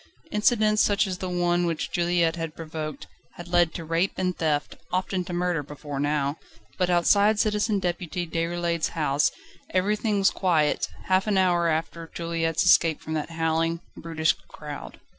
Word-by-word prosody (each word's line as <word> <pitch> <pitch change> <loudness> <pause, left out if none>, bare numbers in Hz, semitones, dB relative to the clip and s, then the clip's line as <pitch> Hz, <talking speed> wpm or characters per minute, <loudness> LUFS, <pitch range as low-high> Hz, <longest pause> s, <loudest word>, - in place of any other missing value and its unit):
Incidents 215 0 +3
such 205 0 +3
as 185 -2 -4
the 185 - -3
one 175 0 +1
which 165 -2 -2
Juliette 170 -1 +1
had 165 -1 -5
provoked, 155 -2 -6 0.3
had 175 - -9
led 175 -1 +3
to 165 - -5
rape 165 +4 +1
and 185 -1 0
theft, 150 -3 -1 0.2
often 185 0 -1
to 180 - -7
murder, 175 -2 0
before 145 0 -7
now: 145 0 0 0.4
but 180 -1 +2
outside 200 +4 +4
Citizen 210 0 +1
Deputy 175 -1 -2
Déroulède's 170 0 -1
house 150 -2 +2 0.4
everything 210 +3 +1
was 195 0 +4
quiet, 160 -6 +1 0.2
half 190 +2 +2
an 205 -2 +2
hour 175 -2 +3
after 165 +1 -2
Juliette's 165 -1 0
escape 165 -3 +5
from 160 - -6
that 155 0 -2
howling, 165 0 0 0.2
brutish 160 -1 0
crowd. 150 -1 -9
170 Hz, 160 wpm, -26 LUFS, 160-185 Hz, 0.4 s, escape